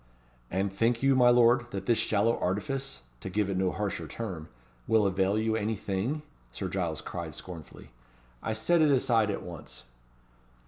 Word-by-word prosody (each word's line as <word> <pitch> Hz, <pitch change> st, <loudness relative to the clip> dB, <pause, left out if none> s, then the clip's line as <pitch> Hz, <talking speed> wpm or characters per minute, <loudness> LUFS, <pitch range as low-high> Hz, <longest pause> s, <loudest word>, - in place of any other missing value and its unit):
"And 95 Hz, +1 st, -1 dB
think 115 Hz, +4 st, +1 dB
you, 135 Hz, 0 st, +5 dB
my 125 Hz, -1 st, +6 dB
lord, 120 Hz, 0 st, +5 dB
that 95 Hz, -3 st, -5 dB
this 115 Hz, 0 st, +3 dB
shallow 110 Hz, +2 st, +2 dB
artifice 115 Hz, -, -2 dB, 0.2 s
to 95 Hz, -, -6 dB
give 100 Hz, +1 st, 0 dB
it 95 Hz, -, -1 dB
no 95 Hz, -1 st, +2 dB
harsher 95 Hz, -5 st, -3 dB
term 90 Hz, -6 st, -6 dB, 0.4 s
will 110 Hz, -2 st, +4 dB
avail 95 Hz, +1 st, +2 dB
you 110 Hz, 0 st, +1 dB
any 110 Hz, 0 st, 0 dB
thing?" 110 Hz, +9 st, -2 dB, 0.3 s
Sir -, -, -4 dB
Giles -, -, -2 dB
cried -, -, -6 dB
scornfully. 85 Hz, -5 st, -10 dB, 0.5 s
"I 110 Hz, -, -2 dB
set 165 Hz, +10 st, +2 dB
it 155 Hz, -, +5 dB
aside 120 Hz, -5 st, +3 dB
at 100 Hz, -, -3 dB
once." 85 Hz, -3 st, -9 dB
110 Hz, 170 wpm, -29 LUFS, 95-120 Hz, 0.5 s, my